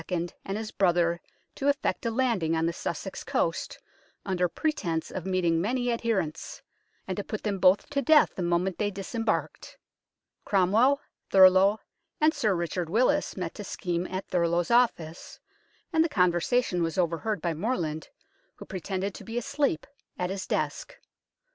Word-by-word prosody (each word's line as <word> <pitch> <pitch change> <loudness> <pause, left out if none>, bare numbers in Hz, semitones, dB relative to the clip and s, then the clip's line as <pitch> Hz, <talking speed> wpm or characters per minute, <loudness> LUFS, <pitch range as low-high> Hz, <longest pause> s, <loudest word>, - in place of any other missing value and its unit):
and 175 -1 -2 0.2
his 220 0 -5
brother 175 -2 +2 0.3
to 275 - -3
effect 280 -3 0
a - - +2
landing 225 -9 +1
on 160 0 +1
the 170 - 0
Sussex - - -5
coast, - - -1 0.5
under 180 -3 +1
pretence 170 - -2
of 185 0 -5
meeting 175 -3 +1
many 245 +5 0
adherents, 220 -9 -2 0.4
and 190 - -2
to 205 - -2
put 215 - -5
them 200 -3 -1
both 185 +2 +4
to 280 -1 +1
death 300 +3 +5
the - - -5
moment 175 +2 0
they 210 - +1
disembarked. 215 +3 -3 0.7
Cromwell, 220 +9 +3 0.3
Thurloe, 190 +2 +6 0.4
and 310 +1 +4
Sir 220 - +1
Richard 170 0 -2
Willis 250 - +1
met 180 -3 -3
to 205 - -7
scheme 180 -3 -3
at 185 +1 -5
Thurloe's 170 0 +1
office, 185 -9 +1 0.5
and 320 0 +5
the 330 - 0
conver 180 - +2
sation 240 -5 +1
was 165 +2 -1
overheard 180 +4 0
by 170 0 -1
Morland, 160 - -2 0.5
who - - -11
pretended 190 +1 -3
to - - -10
be 230 +1 -6
asleep 280 - 0 0.3
at 180 0 -2
his 195 0 -4
desk. - - -2
190 Hz, 155 wpm, -27 LUFS, 175-230 Hz, 0.7 s, Thurloe